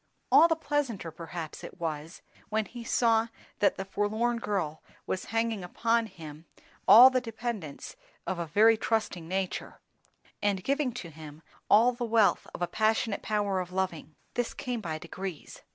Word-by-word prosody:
All 335 Hz, -, +8 dB
the 325 Hz, -, +2 dB
pleasanter 270 Hz, -, -2 dB
perhaps 165 Hz, 0 st, -7 dB
it -, -, -10 dB
was, 160 Hz, 0 st, -5 dB, 0.3 s
when 215 Hz, 0 st, 0 dB
he 240 Hz, +1 st, -9 dB
saw 230 Hz, -1 st, +2 dB, 0.3 s
that 205 Hz, -, +3 dB
the 195 Hz, -, -5 dB
forlorn 220 Hz, +4 st, 0 dB
girl 190 Hz, -10 st, -2 dB, 0.2 s
was 185 Hz, -, -3 dB
hanging 225 Hz, -3 st, -1 dB
upon 230 Hz, +5 st, +1 dB
him 160 Hz, -4 st, -11 dB, 0.4 s
all 250 Hz, +4 st, +10 dB
the 255 Hz, -1 st, +1 dB
dependence 225 Hz, -, -6 dB, 0.3 s
of 180 Hz, 0 st, -3 dB
a 170 Hz, -, -3 dB
very 220 Hz, +7 st, +5 dB
trusting 215 Hz, -7 st, -1 dB
nature, 190 Hz, +1 st, -3 dB, 0.6 s
and 200 Hz, -2 st, 0 dB
giving 275 Hz, +1 st, 0 dB
to 175 Hz, -8 st, -7 dB
him 155 Hz, 0 st, -11 dB, 0.3 s
all 230 Hz, +4 st, +6 dB
the 240 Hz, 0 st, -5 dB
wealth 225 Hz, -3 st, +3 dB
of -, -, -3 dB
a -, -, +1 dB
passionate 220 Hz, +2 st, 0 dB
power 205 Hz, -3 st, 0 dB
of 180 Hz, -1 st, -5 dB
loving. 180 Hz, -5 st, -3 dB, 0.2 s
This 245 Hz, -1 st, -2 dB
came 245 Hz, -3 st, -3 dB
by 160 Hz, -5 st, -3 dB
degrees. 175 Hz, +1 st, -7 dB
205 Hz, 160 wpm, -29 LUFS, 170-230 Hz, 0.6 s, all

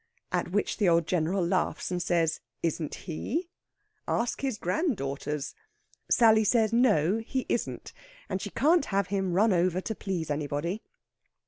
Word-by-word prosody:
At -, -, 0 dB
which -, -, 0 dB
the 205 Hz, -6 st, +3 dB
old 170 Hz, -1 st, +3 dB
General 175 Hz, +2 st, 0 dB
laughs, 185 Hz, +1 st, -1 dB
and 180 Hz, -1 st, -1 dB
says 170 Hz, -2 st, +1 dB, 0.2 s
isn't 165 Hz, -2 st, -1 dB
he? 320 Hz, -, -3 dB, 0.6 s
Ask 235 Hz, 0 st, -1 dB
his 265 Hz, -5 st, -1 dB
granddaughters! 150 Hz, -, -2 dB, 0.6 s
Sally 220 Hz, -2 st, +5 dB
says 220 Hz, +1 st, +2 dB
no, 215 Hz, -5 st, +3 dB
he 250 Hz, +3 st, -3 dB
isn't, 235 Hz, -, -3 dB, 0.3 s
and -, -, -3 dB
she -, -, -4 dB
can't 315 Hz, +1 st, +3 dB
have 195 Hz, -1 st, 0 dB
him 190 Hz, -2 st, 0 dB
run 205 Hz, +3 st, +4 dB
over 180 Hz, 0 st, +2 dB
to 220 Hz, -, -3 dB
please 180 Hz, -7 st, -3 dB
anybody. 150 Hz, +7 st, -2 dB
190 Hz, 145 wpm, -28 LUFS, 165-225 Hz, 0.6 s, Sally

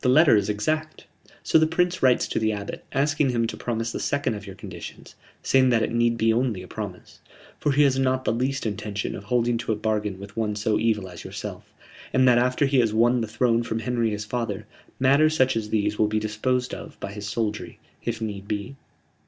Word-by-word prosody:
The 125 Hz, -, +3 dB
letter 150 Hz, +1 st, +6 dB
is 100 Hz, -1 st, +1 dB
exact." 155 Hz, +10 st, -2 dB, 0.4 s
"So -, -, +4 dB
the 160 Hz, -, +4 dB
Prince 180 Hz, +2 st, 0 dB
writes 125 Hz, -2 st, +4 dB
to -, -, 0 dB
the 110 Hz, 0 st, +1 dB
Abbot, 100 Hz, -1 st, -5 dB
asking 145 Hz, +1 st, +1 dB
him 120 Hz, -2 st, +1 dB
to -, -, -4 dB
promise 115 Hz, -1 st, -2 dB
the -, -, -4 dB
second 140 Hz, -4 st, 0 dB
of 105 Hz, -1 st, -7 dB
your 95 Hz, -, -8 dB
conditions, -, -, -9 dB, 0.3 s
saying 130 Hz, -1 st, +4 dB
that 115 Hz, -3 st, +3 dB
it -, -, -1 dB
need 120 Hz, 0 st, +2 dB
be 115 Hz, 0 st, +3 dB
only 115 Hz, -6 st, 0 dB
a -, -, -11 dB
promise, -, -, -8 dB, 0.4 s
for 150 Hz, -, +1 dB
he 145 Hz, +2 st, +5 dB
has 135 Hz, -2 st, +3 dB
not 130 Hz, 0 st, +1 dB
the -, -, +2 dB
least 130 Hz, +3 st, -1 dB
intention 105 Hz, -1 st, -3 dB
of 100 Hz, -, -8 dB
holding 120 Hz, +1 st, +1 dB
to 115 Hz, -, -2 dB
a -, -, +2 dB
bargain 105 Hz, -2 st, -1 dB
with 100 Hz, 0 st, -10 dB
one 110 Hz, -2 st, -1 dB
so 105 Hz, 0 st, 0 dB
evil 110 Hz, -4 st, +1 dB
as 90 Hz, -2 st, -10 dB
yourself, -, -, -7 dB, 0.4 s
and 130 Hz, 0 st, +4 dB
that 120 Hz, -1 st, +6 dB
after 125 Hz, +3 st, +2 dB
he 135 Hz, -1 st, +3 dB
has 110 Hz, -3 st, +2 dB
won 120 Hz, +2 st, +4 dB
the 115 Hz, -, -2 dB
throne 115 Hz, +1 st, +2 dB
from 115 Hz, -1 st, -3 dB
Henry 120 Hz, 0 st, 0 dB
his 105 Hz, 0 st, -4 dB
father, 115 Hz, -2 st, -3 dB, 0.3 s
matters 145 Hz, +4 st, +4 dB
such 130 Hz, -1 st, +3 dB
as 110 Hz, -2 st, -2 dB
these 105 Hz, -1 st, 0 dB
will 105 Hz, -, +4 dB
be 110 Hz, +1 st, -1 dB
disposed 125 Hz, +4 st, -1 dB
of -, -, -8 dB
by 100 Hz, -, -5 dB
his 105 Hz, 0 st, -6 dB
soldiery, 110 Hz, -1 st, -3 dB, 0.3 s
if -, -, -2 dB
need 100 Hz, -3 st, -4 dB
be." 105 Hz, +6 st, -4 dB
115 Hz, 225 wpm, -25 LUFS, 105-130 Hz, 0.4 s, letter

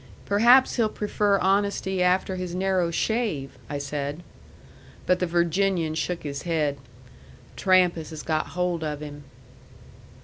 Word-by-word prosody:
"Perhaps 240 Hz, +7 st, +5 dB
he'll 225 Hz, -3 st, +2 dB
prefer 205 Hz, -1 st, 0 dB
honesty 195 Hz, 0 st, 0 dB
after 185 Hz, +1 st, +2 dB
his 180 Hz, -1 st, -5 dB
narrow 185 Hz, -2 st, +1 dB
shave," 170 Hz, -, -1 dB, 0.2 s
I 145 Hz, -, -3 dB
said. 145 Hz, +3 st, -4 dB, 0.8 s
But 180 Hz, 0 st, +2 dB
the 180 Hz, -, 0 dB
Virginian 170 Hz, 0 st, +1 dB
shook 170 Hz, +2 st, -3 dB
his 140 Hz, -2 st, -5 dB
head. 150 Hz, -4 st, -1 dB, 0.8 s
"Trampas 180 Hz, -4 st, +2 dB
has 155 Hz, -2 st, -8 dB
got 155 Hz, 0 st, -2 dB
hold 180 Hz, -2 st, 0 dB
of 150 Hz, -1 st, -4 dB
him." 145 Hz, -1 st, -9 dB
180 Hz, 130 wpm, -25 LUFS, 155-195 Hz, 0.8 s, Perhaps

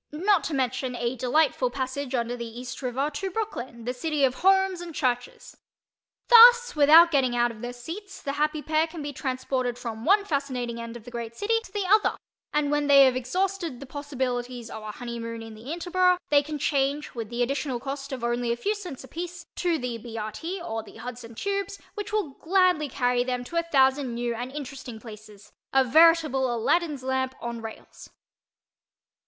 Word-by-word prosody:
not 365 Hz, +4 st, +2 dB
to -, -, -3 dB
mention 255 Hz, -1 st, -1 dB
a 240 Hz, +1 st, -2 dB
delightful 255 Hz, +1 st, +2 dB
passage 260 Hz, +1 st, -3 dB
under 240 Hz, 0 st, -1 dB
the 235 Hz, -1 st, -7 dB
East 255 Hz, +2 st, -7 dB
River 265 Hz, +3 st, -1 dB
to 380 Hz, +6 st, -3 dB
Brooklyn, 265 Hz, -, -5 dB
the 250 Hz, -, -1 dB
city 300 Hz, +2 st, -1 dB
of 260 Hz, -2 st, +4 dB
homes 385 Hz, -1 st, +3 dB
and 340 Hz, -3 st, -8 dB
churches. 245 Hz, -1 st, -2 dB, 0.7 s
Thus 480 Hz, -1 st, +8 dB
without 315 Hz, +3 st, +7 dB
getting 260 Hz, -5 st, +2 dB
out 240 Hz, 0 st, +2 dB
of 220 Hz, -2 st, -12 dB
their 245 Hz, -, -4 dB
seats 330 Hz, -, -8 dB
the 275 Hz, -, -3 dB
happy 300 Hz, +1 st, -1 dB
pair 315 Hz, +1 st, +1 dB
can 320 Hz, -2 st, -8 dB
be 290 Hz, 0 st, -5 dB
transported 255 Hz, -2 st, -2 dB
from 230 Hz, -2 st, -6 dB
one 405 Hz, -, +4 dB
fascinating 255 Hz, -7 st, -2 dB
end 230 Hz, 0 st, -7 dB
of 230 Hz, -, -14 dB
the 245 Hz, -, -10 dB
great 235 Hz, -1 st, -6 dB
city 410 Hz, -, -1 dB
to -, -, -14 dB
the 405 Hz, -1 st, -2 dB
other 420 Hz, +3 st, +3 dB, 0.3 s
and 295 Hz, -1 st, +1 dB
when 295 Hz, 0 st, +1 dB
they 280 Hz, -1 st, +8 dB
have 260 Hz, -1 st, +3 dB
exhausted 340 Hz, +2 st, -2 dB
the 275 Hz, -, -8 dB
possibilities 255 Hz, -4 st, -4 dB
of 220 Hz, -, -7 dB
a 215 Hz, -, -7 dB
honeymoon 230 Hz, 0 st, -6 dB
in 225 Hz, -1 st, -9 dB
the 225 Hz, +6 st, -9 dB
Interborough 360 Hz, +1 st, +2 dB
they 290 Hz, -1 st, +6 dB
can 300 Hz, +1 st, -5 dB
change, 280 Hz, +1 st, 0 dB
with 230 Hz, -4 st, -5 dB
the 240 Hz, +1 st, 0 dB
additional 270 Hz, 0 st, -2 dB
cost 275 Hz, +2 st, -6 dB
of 255 Hz, -3 st, -5 dB
only 240 Hz, 0 st, 0 dB
a 235 Hz, -, -1 dB
few 405 Hz, -, 0 dB
cents 360 Hz, -12 st, -8 dB
apiece, 345 Hz, +4 st, -7 dB
to 345 Hz, -2 st, +1 dB
the 250 Hz, -4 st, -4 dB
B. 230 Hz, 0 st, -8 dB
R. 215 Hz, 0 st, -3 dB
T. 335 Hz, -, -5 dB
or 225 Hz, -10 st, -4 dB
the 215 Hz, -, -15 dB
Hudson 235 Hz, 0 st, -8 dB
Tubes 400 Hz, -, -3 dB
which 415 Hz, +1 st, -6 dB
will 420 Hz, -9 st, -1 dB
gladly 360 Hz, -4 st, +2 dB
carry 245 Hz, -1 st, +1 dB
them 250 Hz, -1 st, -2 dB
to 295 Hz, -, -10 dB
a -, -, +4 dB
thousand 265 Hz, -2 st, +3 dB
new 240 Hz, 0 st, -1 dB
and 245 Hz, +3 st, -5 dB
interesting 270 Hz, -5 st, -7 dB
places—a 215 Hz, +4 st, -4 dB
veritable 305 Hz, -2 st, +4 dB
Aladdin's 285 Hz, +5 st, 0 dB
lamp 260 Hz, 0 st, -1 dB
on 235 Hz, -1 st, -5 dB
rails. 225 Hz, -1 st, -10 dB
265 Hz, 195 wpm, -26 LUFS, 240-325 Hz, 0.7 s, Thus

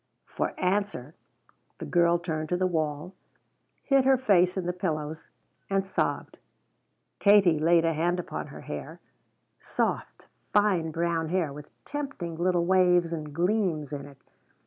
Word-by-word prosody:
For -, -, -4 dB
answer 185 Hz, -7 st, -1 dB, 0.6 s
the -, -, -7 dB
girl 170 Hz, 0 st, +3 dB
turned 155 Hz, -3 st, -4 dB
to 180 Hz, -, +1 dB
the 185 Hz, -, +1 dB
wall, 160 Hz, 0 st, -2 dB, 0.7 s
hid 275 Hz, -2 st, +3 dB
her 265 Hz, 0 st, +4 dB
face 190 Hz, -7 st, +3 dB
in 185 Hz, -, -2 dB
the 180 Hz, -, -1 dB
pillows, 160 Hz, -3 st, -4 dB, 0.4 s
and 195 Hz, -1 st, +1 dB
sobbed. -, -, -2 dB, 0.8 s
Kate 195 Hz, -6 st, +5 dB
laid 165 Hz, +1 st, +4 dB
a 165 Hz, -, +2 dB
hand 175 Hz, +3 st, 0 dB
upon -, -, -5 dB
her -, -, -10 dB
hair -, -, -7 dB, 0.6 s
soft, -, -, -3 dB, 0.3 s
fine 195 Hz, -6 st, +3 dB
brown 165 Hz, 0 st, -1 dB
hair 170 Hz, -5 st, 0 dB
with 150 Hz, +1 st, -10 dB, 0.2 s
tempting 275 Hz, -, -5 dB
little 175 Hz, 0 st, +1 dB
waves 180 Hz, -2 st, +3 dB
and 155 Hz, -2 st, -5 dB
gleams 170 Hz, -3 st, 0 dB
in 140 Hz, 0 st, -5 dB
it. 140 Hz, -1 st, -15 dB
175 Hz, 145 wpm, -27 LUFS, 160-190 Hz, 0.8 s, Kate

